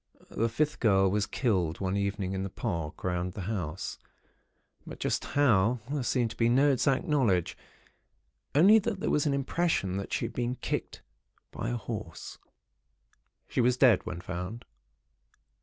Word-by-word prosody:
The 115 +1 0
fifth 150 +6 -1
girl 95 -4 +4
was 105 +1 0
killed 90 - 0
one 95 0 -1
evening 100 -1 -1
in 95 - -2
the 95 - -3
park 85 -7 -4
round 90 0 -1
the 100 - -6
house; 90 -6 -4 0.8
but - - -10
just - - -1
how, 120 -5 +3
there 145 -2 -1
seemed 120 -2 0
to - - -9
be 115 0 +2
no 135 +4 +4
exact 135 +3 +1
knowledge; 120 - +1 1.0
only 200 +9 +7
that 210 -1 -3
there 210 - -1
was 150 0 +2
an 140 - +2
impression 140 - 0
that 100 - -5
she - - -1
had - - -6
been 120 +1 -1
kicked - - -4 0.5
by - - -4
a - - -1
horse. - - -7 1.1
She - - 0
was 125 +1 +3
dead, 125 -7 +5
when 85 0 -5
found. 90 +7 -6
110 Hz, 160 wpm, -29 LUFS, 95-135 Hz, 1.1 s, only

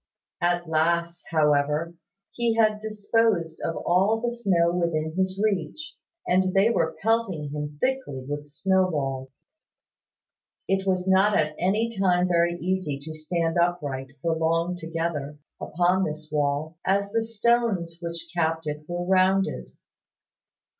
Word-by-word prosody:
At 175 0 +1
last, 170 +2 +1
however, 150 +1 +2 0.4
he 235 -1 0
had 215 -2 +3
disposed 215 -5 0
of 165 - -1
all 195 +6 +3
the 240 +1 -1
snow 175 -7 +2
within 160 -3 -1
his 190 +1 -1
reach, 205 - -2 0.3
and 185 +1 +2
they 200 +4 +5
were 160 -7 0
pelting 195 -10 0
him 150 0 -5
thickly 255 - -2
with 145 +1 -4
snow 185 +5 +1
balls. 135 -4 -4 1.2
It 195 0 0
was 185 -1 0
not 190 +2 +4
at 155 0 0
any 220 +6 0
time 180 -2 +2
very 170 -1 +2
easy 175 -4 -2
to 155 +3 -8
stand 165 +2 -1
upright, 150 -7 0 0.2
for 165 -1 +1
long 165 +2 0
together, 165 -4 -3 0.2
upon 180 +3 +1
this 155 0 -6
wall, 150 +2 -1
as 200 +1 +1
the 225 +1 +1
stones 225 -6 0
which 170 -1 -6
capped 165 -1 0
it 150 0 -4
were 175 0 -3
rounded. 190 +1 +2
175 Hz, 135 wpm, -25 LUFS, 155-195 Hz, 1.2 s, they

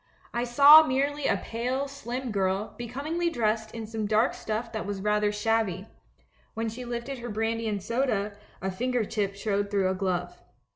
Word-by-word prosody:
I 240 +1 0
saw 285 +6 +9
merely 285 0 0
a 200 - +2
pale, 250 +7 -2
slim 255 -2 -5
girl, 195 +1 -1
becomingly 290 +9 -2
dressed 220 -6 0
in 225 -1 -5
some 215 -1 -3
dark 215 +2 +3
stuff 220 +2 -4
that 220 -3 -4
was 200 -1 -3
rather 210 +1 +1
shabby; 210 -3 0 0.7
when 225 0 -1
she 245 +3 -7
lifted 240 +2 -4
her 240 0 -6
brandy 225 +1 -1
and 205 -2 -3
soda, 215 -3 -1 0.3
a 190 - -1
finger 245 +3 -1
tip 200 -2 -2
showed 200 0 -1
through 195 -2 +1
a - - 0
glove. 180 -2 -2
225 Hz, 175 wpm, -27 LUFS, 205-245 Hz, 0.7 s, saw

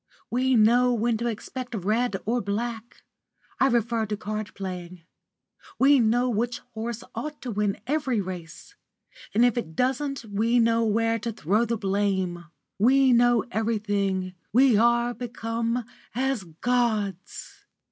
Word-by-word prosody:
We 255 +1 +2
know 240 +3 +4
when 230 0 +1
to 235 +2 -2
expect 245 +2 -5
red 215 +3 0
or 240 +3 0
black 225 +3 -4 0.6
I 270 - +5
refer 230 -2 +1
to 210 0 -3
card 215 +1 -4
playing; 180 -3 -7 0.7
we 275 +1 +5
know 240 +2 +2
which 240 +1 -1 0.2
horse 225 +1 -4
ought 300 0 -5
to 250 - -4
win 205 -1 -1
every 270 -4 0
race, 180 -4 -7 0.6
and 235 +3 +5
if 245 -1 +2
it 160 -8 -7
doesn't 265 - -1
we 220 +3 +1
know 230 0 +3
where 225 +1 +1
to 230 +1 -3
throw 210 +3 +1
the 230 0 -1
blame; 190 -3 -1 0.3
we 260 +4 +5
know 240 -1 +4
everything; 205 -4 -1 0.2
we 255 +1 +5
are 235 +2 +3
become 230 0 -3 0.3
as 260 -5 -1
gods!" 205 +1 -2
230 Hz, 135 wpm, -26 LUFS, 205-245 Hz, 0.7 s, I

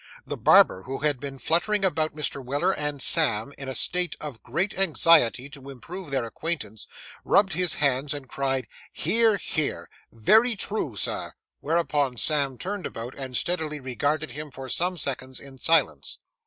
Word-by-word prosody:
The - - -4
barber, 95 - +5
who 135 +6 -5
had 145 -3 +1
been 135 0 -6
fluttering 185 - +1
about 155 -4 0
Mr. 145 -3 -3
Weller 140 +4 0
and 150 -1 -2
Sam 140 -6 +3
in 135 -1 -7
a 130 - -3
state 180 +7 +2
of 145 -7 -8
great 170 - -2
anxiety 160 -8 +4
to 140 -2 -11
improve 165 +6 -8
their 135 -3 -1
acquaintance, 115 -4 -4 0.4
rubbed 195 -1 +3
his 180 -3 +2
hands 140 0 +1
and 140 -2 -7
cried, 135 -1 -1 0.3
'Hear, 225 -2 +2
hear! 155 -5 -3 0.2
Very 220 - +4
true, 195 - -3
sir;' - - -2 0.3
whereupon 145 -5 0
Sam 140 +1 0
turned 200 +4 -4
about 115 +3 -7
and 130 -2 -4
steadily 160 -4 -1
regarded 145 +3 -2
him 150 +3 -7
for 135 0 -9
some 180 +5 0
seconds 130 -3 -4
in 135 -1 -12
silence. 165 +4 +1
145 Hz, 160 wpm, -25 LUFS, 130-170 Hz, 0.4 s, barber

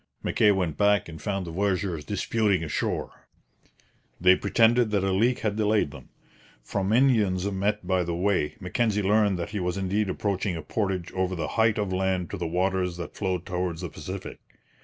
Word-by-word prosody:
Mackay 105 - +3
went 90 -6 +1
back 105 -1 +3
and 80 -1 -9
found 100 -3 -2
the 85 - -6
voyageurs 90 -3 -1
disputing 100 -1 0
ashore. 75 - -3 0.9
They 90 +1 +6
pretended 115 +4 +3
that 100 -2 +1
a 95 - +1
leak 115 +6 +2
had 105 -1 -1
delayed 105 -7 +2
them. - - -12 0.5
From 95 - -2
Indians 110 -7 +3
met 100 +1 -1
by 95 0 +1
the 85 0 -3
way, 90 -4 0
Mackenzie 105 +2 0
learned 100 -1 +3
that 85 +3 -4
he 105 - -3
was 90 +1 -2
indeed 100 +2 0
approaching 95 -1 -1
a 80 - -6
portage 95 0 -2
over 95 0 -1
the 80 - -3
height 110 -1 +2
of 100 -3 -1
land 95 -1 -1
to 100 - -4
the 85 -2 -3
waters 90 +1 0
that 85 -3 -6
flowed 95 -3 -2
towards 90 -2 -3
the 90 - -4
Pacific. 90 +6 -7
95 Hz, 180 wpm, -26 LUFS, 90-105 Hz, 0.9 s, They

